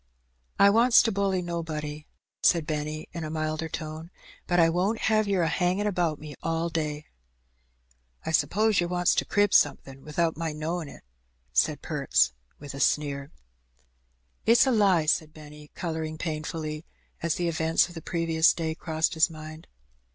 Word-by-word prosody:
"I 200 0 +6
wants 235 +3 +6
to 225 - +1
bully 195 -2 0
nobody," 155 -3 -5 0.3
said 170 -3 +3
Benny, 155 0 -4
in 170 -2 -5
a 155 - -4
milder 155 0 -3
tone; 155 +1 -6 0.4
"but 175 0 +2
I 165 - +6
won't 185 +7 0
have 215 -1 +2
yer 195 -3 +1
a - - +1
hangin' 180 +4 0
about 175 -6 0
me 150 0 -9
all 165 +1 -1
day." 155 -2 -3 1.2
"I - - -2
'spose 215 +6 +2
yer 175 - +1
wants 175 0 +2
to - - 0
crib 205 -1 +2
somethin' 135 -1 +2
without 160 +2 -1
my 165 -1 -3
knowin' 160 +1 -4
it," - - -13 0.5
said - - +1
Perks, - - +1 0.2
with 145 -1 -9
a 140 - -7
sneer. 140 0 0 0.6
" 60 0 -43
It's 230 +3 +6
a 265 - +2
lie," 195 -8 +3
said 155 0 0
Benny, 150 -1 -12
colouring 160 -2 -4
painfully, 155 -1 -4 0.4
as 170 -1 0
the 175 - -1
event 160 0 +2
of 175 - -12
the 165 - -8
previous 165 -1 +2
day 160 -2 -2
crossed 160 0 -1
his 160 +1 +3
mind. 155 0 -10
160 Hz, 165 wpm, -27 LUFS, 155-175 Hz, 1.2 s, I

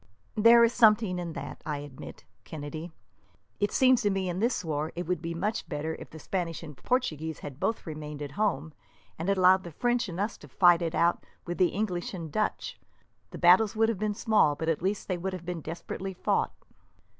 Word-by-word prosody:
"There 230 +2 +7
is 230 +1 +3
something 215 -5 +4
in 170 -2 -4
that, - - -7
I 150 -2 -3
admit, 145 -2 -10 0.2
Kennedy. 155 +2 -7 0.7
It 205 - +1
seems 255 -2 +4
to 205 - +2
me 195 -1 -1
that, - - -2
in 175 - -4
this 230 -3 0
war, 155 0 -2
it 175 +1 -3
would 180 -2 -1
be 170 0 -4
much 210 +6 -2
better 150 +2 -3
if - - -10
the 160 - -11
Spaniards 165 +1 -3
and 150 -3 -9
Portuguese 160 - -1
had 140 -1 -8
both 225 - -1
remained 150 -2 -6
at 140 - -6
home, 160 -5 -1 0.5
and 170 +4 -2
allowed 190 -1 +5
the 175 - -7
French 240 +6 0
and 175 +1 -6
us 205 +3 -1
fight 175 -2 +4
it 165 -1 -2
out 170 +1 +2 0.2
with 175 +1 -5
the 180 - +5
English 190 -2 -3
and 165 -4 -6
Dutch. 215 +4 -2 0.5
The - - -8
battles 185 +5 +5
would 225 +1 +3
have 220 -5 -2
been 210 -1 -1
small, 210 -10 +3
but 160 +3 -2
at 160 - 0
least 195 +3 -1
they 185 -2 -2
would 190 +2 -3
have 180 -2 -7
been 175 -2 -4
desperately 185 +4 -6
fought." - - 0
180 Hz, 210 wpm, -28 LUFS, 160-210 Hz, 0.7 s, There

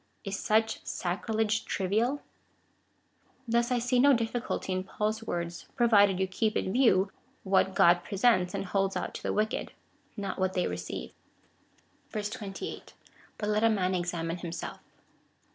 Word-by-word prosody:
Is 195 -1 -3
such 220 +1 +1
sacrilege 215 +4 -1
trivial? 220 +9 0 1.2
Thus 235 +1 +2
I 250 - +2
see 245 +1 +1
no 280 +2 +7
difficulty 230 -4 -1
in 185 0 -1
Paul's 215 +3 -2
words, 170 0 -4
provided 205 -6 +5
you 190 - +2
keep 215 +3 0
in 190 - -1
view 200 -7 +4 0.3
what 190 0 +2
God 175 +1 +5
presents 195 -3 +2
and - - -2
holds 195 0 0
out - - -3
to - - -7
the - - -1
wicked 215 +1 -1 0.2
— - - -37
not 200 -1 -4
what 185 0 +1
they 180 - +1
receive. 90 0 -5 1.0
28. 210 -1 -5 0.4
But 210 - -2
let 210 +1 +2
a 225 - +6
man 190 -4 +1
examine 175 -1 -2
himself. 170 -1 -6
205 Hz, 145 wpm, -29 LUFS, 185-225 Hz, 1.2 s, no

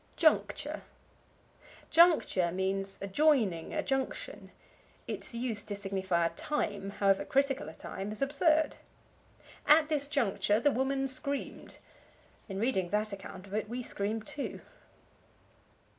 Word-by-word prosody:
Juncture. 315 -2 +2 1.1
Juncture 320 - +5
means 195 +1 -2
a - - -2
joining, 220 - +2
a 305 -1 -1
junction; 275 - -3 0.6
its - - -3
use 230 -4 -2
to 205 -2 -4
signify 190 -3 0
a 165 - 0
time, 205 - -2
however 195 -1 +2
critical 270 - +1
a 160 - -11
time, 195 +2 -6
is 215 - -6
absurd. 305 +3 +2 0.9
"At 305 +1 +6
this 290 -2 +1
juncture 210 -7 +1
the 290 +4 +3
woman 270 +2 0
screamed." 280 +1 -4 0.7
In 195 0 -4
reading 205 -6 +1
that 210 +1 0
account 190 -1 -8
of 200 - -12
it 215 0 -2
we 245 +1 -4
scream 215 0 -3
too. 280 +6 -5
220 Hz, 130 wpm, -31 LUFS, 195-280 Hz, 1.1 s, At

